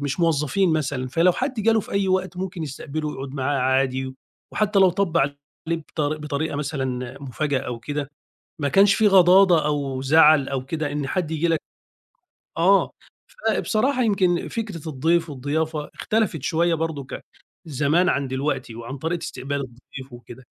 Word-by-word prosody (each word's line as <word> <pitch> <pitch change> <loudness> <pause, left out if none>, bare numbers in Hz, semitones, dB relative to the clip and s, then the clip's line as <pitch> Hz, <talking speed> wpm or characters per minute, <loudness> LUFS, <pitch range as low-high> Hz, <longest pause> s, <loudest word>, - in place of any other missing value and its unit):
مش 145 +4 -3
موظّفين 165 +3 +2
مثلًا، 135 -4 -1
فلو 170 +6 +3
حد 260 +7 -2
جاله 225 +1 +3
في - - -11
أي 200 -1 +1
وقت 185 0 0
ممكن 180 -2 -4
يستقبله 150 +2 -5
ويقعد 135 -1 -6
معاه 140 +1 -1
عادي، 130 0 0 0.4
وحتّى 210 -1 +1
لو 190 -2 +6
طَب 185 -2 -1
عليه 140 -1 0 0.3
بطر 155 -2 -2
بطريقة 150 0 -3
مثلًا 130 -4 -3
مفاجأة 140 +1 -1
أو 120 -1 -5
كده 145 +2 -4 0.5
ما 145 - 0
كانش 195 +6 +5
في 220 - +4
غضاضة 185 -3 +6
أو 140 -3 -2
زَعَل 150 0 +5
أو 130 -2 -3
كده 155 0 -3
إن 145 -2 -2
حد 170 0 -2
ييجي 160 +2 0
لك 165 -2 +1 1.0
آه، - - +4 0.6
فبصراحة 255 +4 +1
يمكن 185 -5 +1
فكرة 200 -9 -5
الضيف 165 +4 +1
والضيافة 150 +3 -3
اختلفِت 215 - -1
شوية 170 +4 +1
برضُك 155 -4 -4
ع - - -6 0.5
زمان 150 +5 +2
عن 140 -1 0
دلوقتي 130 -2 -2
وعن 120 +4 -7
طريقة 165 +4 -3
استقبال 140 +3 -4
الضيف 130 +1 -10
وكده. 120 +1 -12
150 Hz, 155 wpm, -23 LUFS, 135-175 Hz, 1.0 s, لو